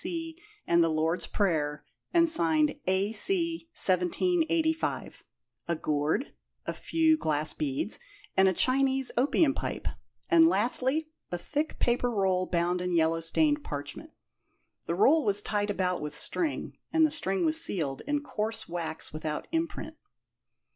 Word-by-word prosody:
B.C. 330 Hz, -1 st, -5 dB, 0.2 s
and 170 Hz, 0 st, +4 dB
the 165 Hz, -, +2 dB
Lord's 160 Hz, +2 st, -1 dB
Prayer 155 Hz, -7 st, -1 dB, 0.3 s
and 335 Hz, -1 st, +4 dB
signed 310 Hz, -2 st, +2 dB
"A.C., 330 Hz, -, +1 dB
1785;" 320 Hz, -, 0 dB, 0.4 s
a 170 Hz, -, 0 dB
gourd, 155 Hz, -, -1 dB, 0.3 s
a -, -, -2 dB
few 320 Hz, -1 st, +2 dB
glass 155 Hz, -, 0 dB
beads, 145 Hz, +7 st, -2 dB, 0.4 s
and 190 Hz, 0 st, +5 dB
a -, -, +4 dB
Chinese 265 Hz, +4 st, +2 dB
opium 275 Hz, +3 st, +3 dB
pipe; -, -, -4 dB, 0.4 s
and 335 Hz, -2 st, +6 dB
lastly, 265 Hz, +5 st, 0 dB, 0.2 s
a 175 Hz, -, -1 dB
thick 295 Hz, -, -3 dB
paper 245 Hz, 0 st, +1 dB
roll 190 Hz, -4 st, +1 dB
bound 175 Hz, +1 st, 0 dB
in 180 Hz, -1 st, -1 dB
yellow 165 Hz, 0 st, +2 dB
stained 295 Hz, -, +1 dB
parchment. 145 Hz, -, -6 dB, 0.8 s
The 170 Hz, -, -1 dB
roll 290 Hz, -, +4 dB
was 205 Hz, -2 st, +1 dB
tied 205 Hz, -1 st, -1 dB
about 185 Hz, -3 st, -1 dB
with 150 Hz, 0 st, -2 dB
string, 320 Hz, -, -1 dB
and 320 Hz, -1 st, +4 dB
the 310 Hz, -, 0 dB
string 195 Hz, -, 0 dB
was 320 Hz, +1 st, +5 dB
sealed, 145 Hz, -, 0 dB
in 290 Hz, 0 st, 0 dB
coarse 225 Hz, -4 st, -4 dB
wax 165 Hz, -3 st, -4 dB
without 155 Hz, -1 st, -4 dB
imprint. 325 Hz, -1 st, -3 dB
215 Hz, 140 wpm, -28 LUFS, -, 0.8 s, and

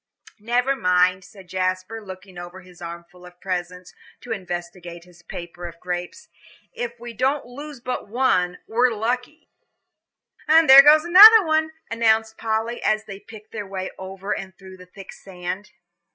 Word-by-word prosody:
"Never 245 Hz, +5 st, 0 dB
mind," 180 Hz, -4 st, +2 dB
said 195 Hz, -2 st, -16 dB
Jasper, 185 Hz, +4 st, -3 dB
looking 185 Hz, -1 st, -11 dB
over 175 Hz, +2 st, -10 dB
his 180 Hz, -1 st, -18 dB
armful 170 Hz, +1 st, -10 dB
of 180 Hz, 0 st, -15 dB
presents, 180 Hz, -1 st, -5 dB, 0.3 s
to 245 Hz, -, -10 dB
investigate 175 Hz, -3 st, -7 dB
his 175 Hz, -1 st, -20 dB
paper 175 Hz, +1 st, -9 dB
of 170 Hz, 0 st, -12 dB
grapes; 180 Hz, 0 st, -6 dB, 0.5 s
"if 235 Hz, -1 st, -6 dB
we 240 Hz, 0 st, -9 dB
don't 265 Hz, +5 st, -1 dB
lose 285 Hz, +3 st, -10 dB
but 250 Hz, -3 st, -5 dB
one, 200 Hz, -6 st, 0 dB
we're 245 Hz, +3 st, +2 dB
lucky." 245 Hz, +7 st, -4 dB, 1.0 s
"And 320 Hz, +1 st, +5 dB
there 270 Hz, 0 st, +11 dB
goes 300 Hz, +2 st, +6 dB
another," 350 Hz, -4 st, +7 dB, 0.2 s
announced 220 Hz, -1 st, +1 dB
Polly, 225 Hz, +1 st, -2 dB
as 215 Hz, 0 st, 0 dB
they 195 Hz, -2 st, -9 dB
picked 215 Hz, 0 st, -15 dB
their 210 Hz, -3 st, -6 dB
way 190 Hz, -1 st, -5 dB
over 190 Hz, +1 st, -5 dB
and 190 Hz, -2 st, -9 dB
through 190 Hz, -1 st, -13 dB
the 180 Hz, 0 st, -15 dB
thick 195 Hz, +1 st, -12 dB
sand. 185 Hz, +2 st, -7 dB
195 Hz, 150 wpm, -22 LUFS, 180-240 Hz, 1.0 s, there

